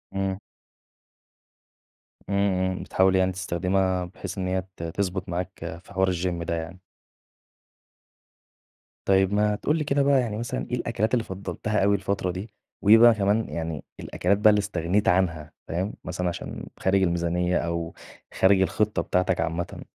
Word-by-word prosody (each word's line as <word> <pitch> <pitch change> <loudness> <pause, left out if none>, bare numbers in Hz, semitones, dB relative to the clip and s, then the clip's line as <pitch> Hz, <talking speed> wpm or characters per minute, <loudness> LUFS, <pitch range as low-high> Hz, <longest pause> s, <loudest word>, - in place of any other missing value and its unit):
إمم. 95 0 -1 1.9
إمم، 100 - 0 0.4
إمم. - - -6
بتحاول 95 0 +2
يعني 95 0 +3
تستخدمها 95 0 0
بحيث 90 +2 -8
إن 95 - -2
هي 95 0 0 0.2
ت 85 - -6
تضبط 90 +2 -3
معاك 90 -1 -5
في - - -15
حوار 95 0 +2
الGym 85 -1 -2
ده 85 - -2
يعني. 85 +3 -6 2.3
طيب 95 0 +3
ما 105 0 +2
تقول 150 +9 0
لي 155 - -1
كده 140 -1 +1
بقى 140 -1 +4
يعني 110 -3 -3
مثلًا 120 +2 -3
إيه - - +1
الأكلات 115 -2 -1
اللي 120 -3 +2
فضّلتها 100 +2 -2
أوي 100 +1 +4
الفترة 95 -1 -1
دي؟ 100 +4 -7 0.3
وإيه 105 +2 +7
بقى 120 0 +8
كمان 105 +1 +1
يعني، 80 -3 -4 0.2
الأكلات 100 +3 0
بقى 105 +1 +6
اللي 105 0 +4
استغنيت 100 0 0
عنها، 80 -4 0
فاهم؟ 95 +6 -2
مثلًا 90 -1 -2
عشان 85 - -6
خارج 95 +1 +2
الميزانية، 90 0 +1
أو 85 -1 -2 0.4
خارج 95 0 +4
الخطّة 105 -1 +1
بتاعتك 90 +1 0
عامةً. 85 +2 -3
95 Hz, 155 wpm, -25 LUFS, 90-105 Hz, 2.3 s, بقى